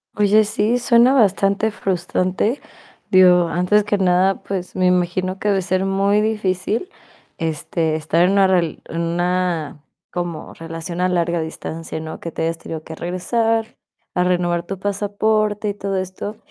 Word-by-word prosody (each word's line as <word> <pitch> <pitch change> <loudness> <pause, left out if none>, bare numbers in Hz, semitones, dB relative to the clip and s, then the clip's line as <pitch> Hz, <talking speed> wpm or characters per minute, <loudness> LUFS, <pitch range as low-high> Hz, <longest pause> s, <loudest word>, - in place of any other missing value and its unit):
Oye, 210 +1 +4
sí, 215 +3 +1
suena 245 +1 +4
bastante 200 -2 +2
frustrante. 185 - -1 0.5
Digo, 180 -2 +6
antes 180 +5 +2
que 210 0 0
nada, 190 0 +2
pues, 185 -2 -5
me 185 - +1
imagino 180 +1 +1
que - - -3
debe 195 -2 +2
ser 185 +1 0
muy 200 +2 +2
difícil, 210 - -1 0.5
este, 160 0 -1
estar 160 +2 0
en 190 - +2
una 195 -1 +5
rel 175 -4 +1
en 165 +1 -3
una 170 -3 -1 0.3
como 175 -2 -5
relación 165 +2 -6
a 185 - +2
larga 170 -1 0
distancia, 160 0 -6
¿no? 160 0 -7
Que 165 - -6
te 160 - -3
hayas 165 0 -1
tenido 160 -1 -7
que 160 - -9
regresar 225 +7 -1 0.4
a 180 - +1
renovar 175 -1 0
tu 195 - -4
pasaporte 210 +1 0
y 205 - -1
todo 195 -1 -3
esto. 185 +3 -5
185 Hz, 155 wpm, -20 LUFS, 170-205 Hz, 0.5 s, Digo